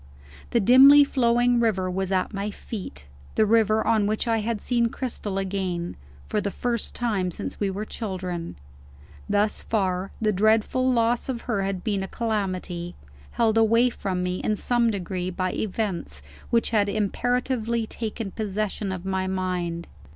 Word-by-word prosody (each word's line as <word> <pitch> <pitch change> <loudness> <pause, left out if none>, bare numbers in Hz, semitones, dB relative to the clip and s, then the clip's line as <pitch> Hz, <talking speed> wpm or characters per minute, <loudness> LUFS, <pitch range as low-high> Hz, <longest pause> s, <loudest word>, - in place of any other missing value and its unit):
The 235 - +2
dimly 270 +6 +8
flowing 245 -2 +2
river 205 -6 +1
was 190 +1 -2
at 190 +3 0
my 200 +1 -2
feet; 190 - -8 0.3
the 220 - +4
river 220 0 +3
on 215 -3 +3
which 215 +3 -1
I 225 -1 +2
had 220 0 -2
seen 235 0 +1
Cristel 230 -6 -4
again, 185 -3 -2 0.3
for 210 - -1
the 205 - -1
first 235 +2 -2
time 210 -7 0
since - - -6
we 200 - +1
were 200 +3 -4
children. 185 -6 -5 0.7
Thus 205 +1 +1
far, 190 -3 -1
the 215 -1 +2
dreadful 220 +5 +2
loss 235 +1 +1
of 240 -3 -2
her 215 -5 -1
had 195 -2 -2
been 205 -3 0
a 190 - -3
calamity, 185 -6 -3 0.4
held 225 -1 +3
away 230 +2 +4
from 185 -5 -3
me 180 0 -1
in 215 - 0
some 235 +2 +2
degree 185 -3 -3
by 185 0 -2
events 185 - -3 0.3
which 235 0 +1
had 205 -3 +2
imperatively 235 +2 0
taken 220 -2 -5
possession 210 -1 -2
of 185 -1 -5
my 190 -1 -1
mind. 180 -2 -2
210 Hz, 160 wpm, -25 LUFS, 190-230 Hz, 0.7 s, dimly